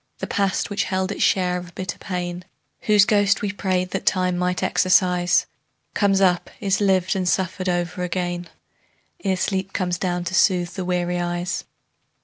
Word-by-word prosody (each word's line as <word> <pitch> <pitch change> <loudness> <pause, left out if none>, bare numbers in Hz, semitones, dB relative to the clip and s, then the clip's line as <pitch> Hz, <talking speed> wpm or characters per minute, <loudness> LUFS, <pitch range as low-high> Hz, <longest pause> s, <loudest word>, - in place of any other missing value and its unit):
The - - -4
past 200 0 -1
which 205 - 0
held 190 0 -1
its - - -5
share 180 -1 +2
of 175 -1 -9
bitter 185 0 -5
pain, 180 -1 -4 0.4
Whose 210 -2 +6
ghost 205 -1 +2
we 205 - 0
prayed 185 -2 -1
that - - -3
Time 185 -1 +2
might 180 0 -1
exorcise, 180 -1 +3 0.5
Comes 195 -2 +2
up, 180 -2 +2
is 195 0 0
lived 190 -1 +2
and 185 -2 0
suffered 185 0 -1
o'er 175 0 -2
again, 175 -1 -3 0.7
Ere 190 -1 +1
sleep 190 0 -2
comes 180 -2 -1
down 180 -1 -1
to 175 - -4
soothe 180 -2 +2
the 190 -2 -4
weary 180 0 -1
eyes. 175 +1 -2
185 Hz, 165 wpm, -22 LUFS, 175-190 Hz, 0.7 s, Whose